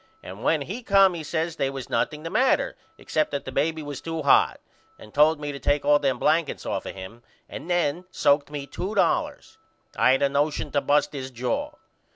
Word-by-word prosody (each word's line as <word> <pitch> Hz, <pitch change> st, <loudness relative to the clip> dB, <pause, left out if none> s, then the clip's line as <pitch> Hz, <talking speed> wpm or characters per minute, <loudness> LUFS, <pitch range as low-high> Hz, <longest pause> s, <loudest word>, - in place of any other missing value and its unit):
And 95 Hz, +4 st, -9 dB
when 155 Hz, -3 st, +2 dB
he 200 Hz, -, -6 dB
come 195 Hz, -4 st, +4 dB
he 170 Hz, -, -5 dB
says 165 Hz, +2 st, -3 dB
they 135 Hz, -, 0 dB
was 135 Hz, -2 st, -6 dB
nothing 150 Hz, 0 st, -1 dB
the 165 Hz, -, -5 dB
matter 260 Hz, +1 st, +2 dB, 0.2 s
except 155 Hz, -1 st, -1 dB
that 140 Hz, -, -4 dB
the 130 Hz, -, -6 dB
baby 155 Hz, +4 st, -1 dB
was 145 Hz, -2 st, -7 dB
to 165 Hz, -1 st, -4 dB
hot 140 Hz, -, +4 dB, 0.4 s
and 105 Hz, -, -15 dB
told 150 Hz, +1 st, +4 dB
me 145 Hz, -1 st, -4 dB
to 140 Hz, -, -7 dB
take 145 Hz, 0 st, 0 dB
all 145 Hz, 0 st, +5 dB
them 135 Hz, -3 st, 0 dB
blankets 155 Hz, 0 st, 0 dB
off -, -, -3 dB
of -, -, -7 dB
him 95 Hz, +5 st, -10 dB, 0.3 s
and 170 Hz, -, -9 dB
then 175 Hz, 0 st, 0 dB
soaked 145 Hz, -5 st, +2 dB
me 145 Hz, -2 st, -5 dB
2 190 Hz, +8 st, -5 dB
dollars. 200 Hz, -, 0 dB, 0.4 s
I 130 Hz, -, +4 dB
had 135 Hz, -, +1 dB
a 140 Hz, -, +3 dB
nosion 145 Hz, +2 st, -1 dB
to 145 Hz, -, +1 dB
bust 145 Hz, +1 st, +1 dB
his 130 Hz, -2 st, -5 dB
jaw. 275 Hz, -, -3 dB
145 Hz, 210 wpm, -25 LUFS, 140-165 Hz, 0.4 s, all